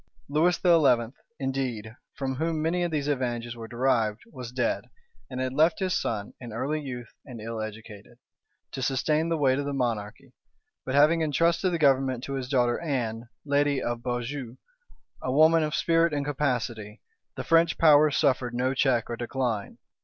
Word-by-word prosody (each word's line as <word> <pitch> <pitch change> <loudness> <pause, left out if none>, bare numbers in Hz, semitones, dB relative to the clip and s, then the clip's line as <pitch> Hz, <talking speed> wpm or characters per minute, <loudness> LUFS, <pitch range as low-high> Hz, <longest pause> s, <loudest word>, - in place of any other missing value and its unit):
Lewis 160 +5 +2
XI, 135 -9 +3 0.2
indeed, 125 -5 -3 0.2
from 130 -2 -3
whom 160 +1 -1
many 165 +3 0
of 175 - 0
these 150 -3 -2
advantages 120 -4 -2
were 115 -1 -8
derived, 120 -3 0
was 125 -2 -8
dead, 125 -1 -1 0.4
and 130 -1 -5
had 130 0 -2
left 160 +4 +3
his 185 -2 -1
son, 105 - -2
in 120 -3 -9
early 135 +7 -2
youth 125 -5 -7
and 125 -4 -10
ill 115 0 -5
educated, 110 -1 -9 0.5
to 130 - -5
sustain 150 +5 +1
the 165 - 0
weight 135 -2 +2
of 145 - -2
the 145 - -3
monarchy: 115 -5 -3 0.5
but 130 - -1
having 155 +3 +5
intrusted 165 +4 +1
the 170 - 0
government 135 -4 +2
to 140 - -5
his 130 -2 -4
daughter 120 -3 +2
Anne, 120 -7 -3 0.2
lady 145 -1 +2
of 120 -1 -3
Beaujeu, 125 +1 -4 0.6
a 130 - -2
woman 160 +4 +5
of 155 +1 -1
spirit 165 -1 +2
and 140 -1 -2
capacity, 120 -7 -2 0.4
the - - -4
French 165 0 +3
power 155 -1 +6
suffered 130 -4 +1
no 130 +2 0
check 130 -3 +1
or 120 - -4
decline. 120 -3 -3
130 Hz, 170 wpm, -27 LUFS, 120-150 Hz, 0.6 s, power